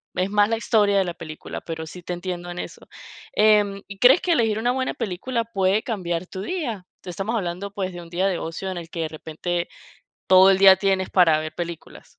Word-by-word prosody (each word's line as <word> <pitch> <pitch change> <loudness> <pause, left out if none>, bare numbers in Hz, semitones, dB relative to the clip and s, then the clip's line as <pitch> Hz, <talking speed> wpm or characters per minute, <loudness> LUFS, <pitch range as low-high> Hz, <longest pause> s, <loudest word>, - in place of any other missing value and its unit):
es 185 +2 0
más 205 0 +3
la 225 - 0
historia 205 -3 +2
de 195 - +4
la 175 -2 -4
película, 155 -3 -8
pero 160 -1 -6
sí 180 +3 -10
te 180 - -5
entiendo 175 0 -5
en 175 0 -6
eso, - - -8 0.5
em, 210 -2 +3
¿y 200 -1 -10
crees 265 +7 +6
que 355 - 0
elegir 225 -8 +2
una 240 +2 +1
buena 260 0 -1
película 230 +3 -3
puede 195 -1 0
cambiar 180 -8 -3
tu 190 - -7
día? 230 - -4 0.2
Estamos 195 +6 -3
hablando, 190 0 -3
pues, 190 -2 -3
de 175 - -7
un 170 - -12
día 185 +3 0
de 185 -3 -1
ocio 175 +4 -5
en 180 - -5
el 165 -1 -8
que 170 -2 -5
de 160 - -1
repente 170 +2 -4 0.6
todo 190 +1 +7
el 190 - +3
día 195 -1 +9
tienes 190 -1 0
para 165 -4 +5
ver 155 0 -5
películas. 170 -1 -7
190 Hz, 220 wpm, -23 LUFS, 175-210 Hz, 0.6 s, día